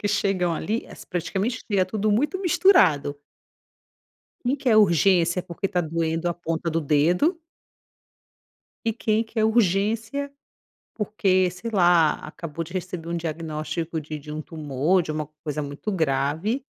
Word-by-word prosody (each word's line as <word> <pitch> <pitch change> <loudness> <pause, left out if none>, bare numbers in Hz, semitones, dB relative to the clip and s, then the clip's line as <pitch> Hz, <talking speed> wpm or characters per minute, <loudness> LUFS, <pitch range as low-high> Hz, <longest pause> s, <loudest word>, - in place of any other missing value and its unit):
que 205 - -1
chegam 195 -4 +1
ali, 220 +8 -2
es - - -12
praticamente 195 +6 -2
é 190 -2 +3
tudo 210 +2 -1
muito 295 - +1
misturado. 185 - +4 1.3
Quem 255 +3 +1
quer 250 -5 +2
urgência 180 -2 +4
porque 180 +2 -4
está 180 -1 0
doendo 165 +1 -1
a 170 - -1
ponta 165 -1 -3
do 165 +1 0
dedo 170 - +2 1.5
e 225 - +1
quem 220 0 0
quer 220 0 -1
urgência 220 +5 +1 0.6
porque, 195 -4 +1
sei 185 +6 -6
lá, 175 -6 +5
acabou 165 +1 -6
de 165 - -13
receber 180 -2 -5
um 170 - -1
diagnóstico 160 0 -3
de 150 0 -6
de 150 +1 -10
um 155 +1 -4
tumor, 155 +3 0
de 155 - -4
uma 155 -1 -3 0.2
coisa 150 -1 -3
muito 145 +9 -5
grave. 160 - 0
175 Hz, 145 wpm, -24 LUFS, 160-215 Hz, 1.5 s, lá